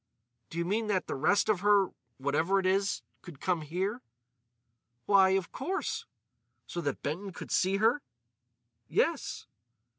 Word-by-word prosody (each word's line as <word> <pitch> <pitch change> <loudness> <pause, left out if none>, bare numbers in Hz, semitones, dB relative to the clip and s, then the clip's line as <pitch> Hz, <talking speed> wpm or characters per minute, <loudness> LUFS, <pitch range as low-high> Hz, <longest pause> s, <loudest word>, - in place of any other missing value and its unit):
"Do 165 - -8
you 170 - 0
mean 215 +4 0
that 195 -3 +1
the - - -3
rest 200 +10 +2
of 215 -4 +2
her—whatever 170 - +1
it 190 - 0
is—could 190 -5 -2
come 180 -3 0
here?" 190 - -2 1.0
"Why, 195 -2 +6
of 190 - -4
course." 370 +9 -3 0.6
"So 175 - -4
that 145 -4 -3
Benton 180 +7 -3
could - - -8
see 190 +2 +2
her?" 225 +7 +3 0.9
"Yes." - - 0
190 Hz, 130 wpm, -30 LUFS, 170-205 Hz, 1.0 s, Why